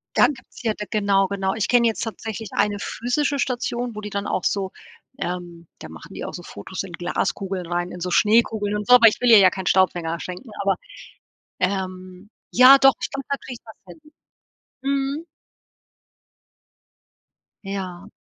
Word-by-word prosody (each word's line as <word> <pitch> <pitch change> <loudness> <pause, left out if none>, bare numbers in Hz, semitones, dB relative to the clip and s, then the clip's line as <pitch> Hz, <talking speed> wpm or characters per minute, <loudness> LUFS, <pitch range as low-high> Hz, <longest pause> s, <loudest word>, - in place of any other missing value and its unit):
Dann - - +5
gibt's 235 - -15
hier 225 -3 0
d 210 - -6
genau, 200 -2 +2
genau. 190 -1 -1
Ich 215 -2 -1
kenne 240 -1 +4
jetzt 225 - -1
tatsächlich 225 -2 -5
eine 205 0 +1
physische 275 +7 -1
Station, 245 -3 -2
wo 215 - -6
die 210 - -6
dann 200 0 -3
auch 185 - -2
so 195 -2 -1 0.5
ähm, 175 -3 -5
da 80 - -9
machen 80 -1 -12
die - - -6
auch - - -6
so - - -8
Fotos 100 - -7
in 190 - -9
Glaskugeln 180 +1 -3
rein, 175 +1 -1
in 180 - -8
so 180 +1 -3
Schneekugeln 210 0 +2
und 210 - -4
so, 250 - +9
aber 235 -2 +8
ich 215 - +2
will 245 - +3
ihr 225 - +9
ja 190 -2 +7
keinen 190 +1 -6
Staubfänger 175 -3 +1
schenken, 185 +7 -8
aber 195 -1 +2 0.8
ähm, 185 0 -3 0.2
ja 255 +3 +8
doch, 270 0 +6
ich - - -2
glaube, 275 -1 -6
da 280 - +1
kann 255 - -9
ich 235 - -10
was 220 - -12
finden. 305 -1 -15 0.7
Mhm. 275 +3 -1 2.4
Ja. 195 -1 -6
205 Hz, 180 wpm, -22 LUFS, 185-240 Hz, 2.4 s, so